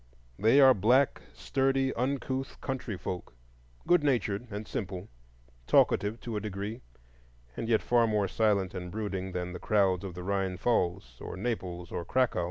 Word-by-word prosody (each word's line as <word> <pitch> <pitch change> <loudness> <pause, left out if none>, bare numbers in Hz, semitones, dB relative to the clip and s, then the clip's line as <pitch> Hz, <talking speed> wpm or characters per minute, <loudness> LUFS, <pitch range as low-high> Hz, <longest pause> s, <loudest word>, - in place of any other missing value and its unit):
They 115 +7 +5
are 135 -2 +8
black, 125 +7 +3
sturdy, 135 0 0
uncouth 130 +1 -2
country 130 -7 -4
folk, 90 -8 -6 0.5
good 175 -3 +4
natured 120 -5 0
and 105 +1 -6
simple, 95 -2 -5 0.6
talkative 105 +3 +3
to 115 -2 -5
a - - 0
degree, 105 +1 -5 0.7
and 115 - -4
yet 110 -2 +3
far 120 -1 +3
more 105 -2 +1
silent 100 -2 +1
and 90 -1 -5
brooding 95 -2 -4
than 90 0 -3
the - - -6
crowds 95 -4 +2
of 95 -3 -6
the 90 - -6
Rhine 95 -1 -1
pfalz, 85 - -1
or - - -6
Naples, 90 -6 -4
or 85 - -3
Cracow. 125 +2 +1
105 Hz, 160 wpm, -30 LUFS, 95-120 Hz, 0.7 s, are